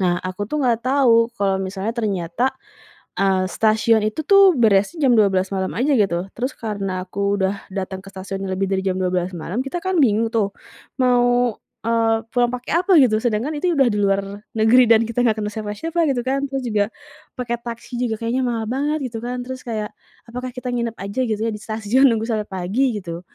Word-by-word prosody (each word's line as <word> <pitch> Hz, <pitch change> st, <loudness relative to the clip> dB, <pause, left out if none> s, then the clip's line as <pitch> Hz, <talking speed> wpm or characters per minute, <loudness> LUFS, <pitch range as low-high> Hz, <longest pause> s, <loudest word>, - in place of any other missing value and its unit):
Nah 180 Hz, -2 st, +2 dB
aku 185 Hz, +2 st, -4 dB
tuh 300 Hz, +4 st, -2 dB
enggak 235 Hz, -1 st, +1 dB
tahu 250 Hz, -4 st, +4 dB
kalau 195 Hz, -3 st, +1 dB
misalnya 195 Hz, +3 st, -3 dB
ternyata, 215 Hz, +2 st, -1 dB, 0.6 s
eee, 190 Hz, -1 st, +1 dB
stasiun 220 Hz, +2 st, +2 dB
itu 215 Hz, +9 st, -1 dB
tuh 395 Hz, -4 st, +7 dB
beresnya 230 Hz, -, +3 dB
jam 250 Hz, -, +5 dB
12.00 195 Hz, -3 st, +2 dB
malam 190 Hz, 0 st, -1 dB
aja 275 Hz, +4 st, +2 dB
gitu, 190 Hz, -5 st, +1 dB
terus 255 Hz, +3 st, -2 dB
karena 195 Hz, -4 st, -3 dB
aku 200 Hz, +2 st, -1 dB
udah 190 Hz, +1 st, +1 dB, 0.2 s
datang 190 Hz, -1 st, -4 dB
ke 195 Hz, -, -12 dB
stasiun 195 Hz, 0 st, -6 dB
yang 190 Hz, -, -3 dB
lebih 195 Hz, +1 st, -1 dB
dari 190 Hz, 0 st, -1 dB
jam 190 Hz, -1 st, -1 dB
12.00 180 Hz, -1 st, -1 dB
malam 180 Hz, +9 st, -3 dB
kita 275 Hz, +6 st, -4 dB
kan 375 Hz, +1 st, -1 dB
bingung 225 Hz, -1 st, +2 dB
tuh 215 Hz, -3 st, +1 dB, 0.5 s
mau, 245 Hz, -2 st, +3 dB, 0.3 s
eee, 225 Hz, -1 st, +2 dB, 0.2 s
pulang 245 Hz, -1 st, +3 dB
pakai 250 Hz, 0 st, -5 dB
apa 390 Hz, -, -1 dB
gitu 220 Hz, -5 st, +4 dB
sedangkan 240 Hz, +6 st, -1 dB
itu 360 Hz, -, +2 dB
udah 270 Hz, -2 st, +5 dB
di 210 Hz, -3 st, 0 dB
luar 195 Hz, 0 st, +2 dB, 0.4 s
negeri 225 Hz, +4 st, +6 dB
dan 230 Hz, 0 st, +5 dB
kita 230 Hz, +1 st, -1 dB
nggak 220 Hz, -3 st, +2 dB
kenal 210 Hz, 0 st, -3 dB
siapa-siapa 220 Hz, +11 st, -4 dB
gitu 245 Hz, -, -1 dB
kan 275 Hz, +1 st, 0 dB
terus 270 Hz, -1 st, -3 dB
juga 210 Hz, -2 st, +1 dB, 0.5 s
pakai 240 Hz, -1 st, -1 dB
taksi 235 Hz, +1 st, -7 dB
juga 225 Hz, -3 st, -1 dB
kayaknya 235 Hz, +3 st, -1 dB
mahal 230 Hz, -2 st, -1 dB
banget 290 Hz, +6 st, -1 dB
gitu 225 Hz, -, -4 dB
kan 250 Hz, +1 st, -3 dB
terus 260 Hz, 0 st, -6 dB
kayak, 215 Hz, -3 st, -4 dB, 0.3 s
"Apakah 250 Hz, +2 st, -5 dB
kita 250 Hz, +1 st, -6 dB
nginep 235 Hz, -2 st, -2 dB
aja 200 Hz, +6 st, -3 dB
gitu 220 Hz, -4 st, -1 dB
ya -, -, -1 dB
di 210 Hz, -, -10 dB
stasiun 220 Hz, +5 st, +2 dB
nunggu 225 Hz, -1 st, -1 dB
sampai 215 Hz, -3 st, -2 dB
pagi 210 Hz, +6 st, 0 dB
gitu?" 170 Hz, -3 st, -7 dB
225 Hz, 200 wpm, -21 LUFS, 195-250 Hz, 0.6 s, tuh